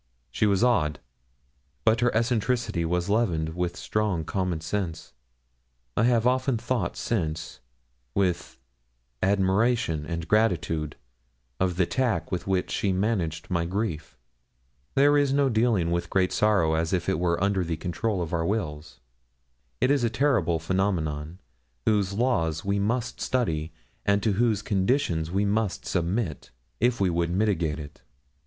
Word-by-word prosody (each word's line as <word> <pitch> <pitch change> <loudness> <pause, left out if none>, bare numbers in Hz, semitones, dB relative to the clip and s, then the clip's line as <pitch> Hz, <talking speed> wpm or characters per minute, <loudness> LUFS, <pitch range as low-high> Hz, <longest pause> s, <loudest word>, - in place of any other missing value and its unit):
She 105 - +1
was 100 +2 +2
odd, 75 - +2 0.9
but 110 +1 +4
her 125 0 +3
eccentricity 115 -5 0
was 90 +1 0
leavened 95 -8 +1
with 90 +1 -3
strong 105 -7 -1
common 90 -3 -1
sense; 85 0 -4 0.8
and 115 - +3
I - - +5
have 115 -2 +2
often 130 0 +2
thought 115 -5 -2
since 80 - -2 0.6
with 90 -3 0 0.6
admiration 95 -3 +2
and 85 -1 -4
gratitude 85 -8 +1 0.6
of 90 -2 +1
the 90 0 +2
tact 110 -8 -1
with 90 -1 -3
which 95 -1 0
she 100 - 0
managed 90 -5 -1
my 85 -2 +1
grief. 90 -4 -3 0.8
There 145 +2 +5
is 140 -2 +2
no 140 -1 +3
dealing 110 -7 +2
with 85 0 -1
great 95 -1 +2
sorrow 100 -7 +3
as 80 +2 0
if 90 -2 0
it 95 - +1
were 85 -1 +1
under 100 0 +1
the 80 -2 -3
control 90 +3 -2
of 80 - -6
our 85 -1 +1
wills. 80 - -3 0.8
It 130 - +3
is 140 -3 +2
a 115 - +3
terrible 110 - +2
phenomenon, 80 -3 -1 0.5
whose 105 -3 +2
laws 100 -9 0
we 100 +1 +1
must 120 +4 -1
study, 80 -11 -1 0.3
and 100 -1 +2
to 110 - +2
whose 110 0 +1
conditions 95 - +1
we 100 +3 +1
must 105 -1 -1
submit, 90 - -2 0.3
if 120 -1 +2
we 95 -2 +2
would 85 0 0
mitigate 90 -5 0
it. 75 -1 -10
95 Hz, 150 wpm, -26 LUFS, 85-110 Hz, 0.9 s, I